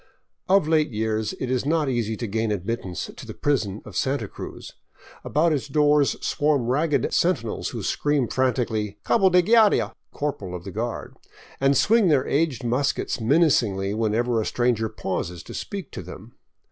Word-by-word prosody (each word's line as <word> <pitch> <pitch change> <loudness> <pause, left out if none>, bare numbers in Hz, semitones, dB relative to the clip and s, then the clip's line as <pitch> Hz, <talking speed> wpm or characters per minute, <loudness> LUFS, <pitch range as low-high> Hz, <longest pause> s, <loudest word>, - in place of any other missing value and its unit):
Of 195 -5 +4
late 155 -1 +3
years 110 -1 -1
it 130 -1 -2
is 130 -1 0
not 155 +1 +1
easy 115 -4 -1
to 120 - -4
gain 110 +1 -1
admittance 95 -2 -4
to - - -10
the - - -8
prison 110 -8 -1
of 105 - -11
Santa 135 -2 0
Cruz. - - -9 0.5
About 160 +2 +2
its 145 0 -2
doors 145 0 +3
swarm 145 -4 +1
ragged 145 +5 +1
sentinels 170 -11 0
who - - -6
scream 145 -4 0
frantically 115 -6 -1
" - - -36
Cabo 195 -5 +4
de 180 0 +4
Guardia! 220 +1 +4
" - - -53
("Corporal 105 -11 -4
of 85 - -7
the 95 - -7
Guard"), 115 +4 -4 0.4
and 135 0 +3
swing 215 - +4
their 140 -5 +3
aged 145 -3 0
muskets 125 +1 -1
menacingly 110 - +2
whenever 115 +2 +1
a - - -3
stranger 120 -3 0
pauses 90 -4 -4
to - - -10
speak 200 -3 -6
to - - -6
them. - - -11
125 Hz, 170 wpm, -24 LUFS, 110-150 Hz, 0.5 s, Of